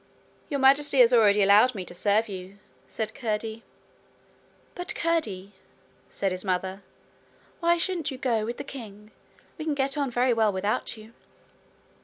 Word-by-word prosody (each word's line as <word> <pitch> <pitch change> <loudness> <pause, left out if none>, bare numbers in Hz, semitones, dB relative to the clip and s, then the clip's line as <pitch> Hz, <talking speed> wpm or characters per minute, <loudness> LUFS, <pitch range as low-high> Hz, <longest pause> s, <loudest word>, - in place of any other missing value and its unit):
'Your 280 - -2
Majesty 275 +1 +4
has 240 0 +5
already 210 -3 +5
allowed 210 +5 +5
me 190 -3 -5
to 175 - -8
serve 205 +5 +1
you,' 190 0 -8 0.3
said 220 -2 -4
Curdie. 220 -1 -3 1.1
'But, 355 - -5
Curdie,' 215 - -1 0.6
said 195 -1 -2
his 185 0 -2
mother, 190 0 -2 0.8
'why 340 0 +3
shouldn't 340 -3 -1
you 265 - -6
go 235 -4 0
with 235 +2 -4
the - - -5
king? 215 -5 -10 0.5
We 310 - -5
can 305 -2 -1
get 275 +1 -1
on 280 -2 0
very 245 +1 +2
well 220 -2 +2
without 205 +4 -2
you.' 220 +1 -14
225 Hz, 155 wpm, -26 LUFS, 200-270 Hz, 1.1 s, has